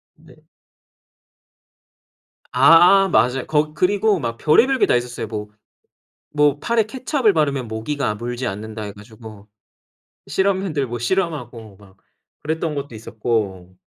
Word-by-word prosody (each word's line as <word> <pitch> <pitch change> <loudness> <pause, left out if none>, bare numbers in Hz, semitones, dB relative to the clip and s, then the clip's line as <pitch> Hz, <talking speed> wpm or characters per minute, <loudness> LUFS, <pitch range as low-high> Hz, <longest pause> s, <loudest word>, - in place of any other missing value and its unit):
네. - - -19 2.2
아 175 +9 +6
맞아요. 125 -3 +1
거 150 0 0
그리고 200 +4 +1
막 115 -4 -4
별의별 255 - +3
게 - - +5
다 - - +2
있었어요. 120 -2 -3
뭐 105 -1 -6 0.8
뭐 145 -1 +2
팔에 230 -1 +1
케첩을 255 0 0
바르면 140 -6 0
모기가 110 +2 -3
물지 120 +3 -5
않는다 110 +1 -6
해 105 - -6
가지고 105 0 -14 0.8
실험맨들 190 -7 -1
뭐 120 0 -4
실험하고 120 - -3
막 95 -1 -20 0.5
그랬던 160 0 -2
것도 140 -3 -6
있었고. 105 -5 -3
130 Hz, 255 characters per minute, -20 LUFS, 110-165 Hz, 2.2 s, 아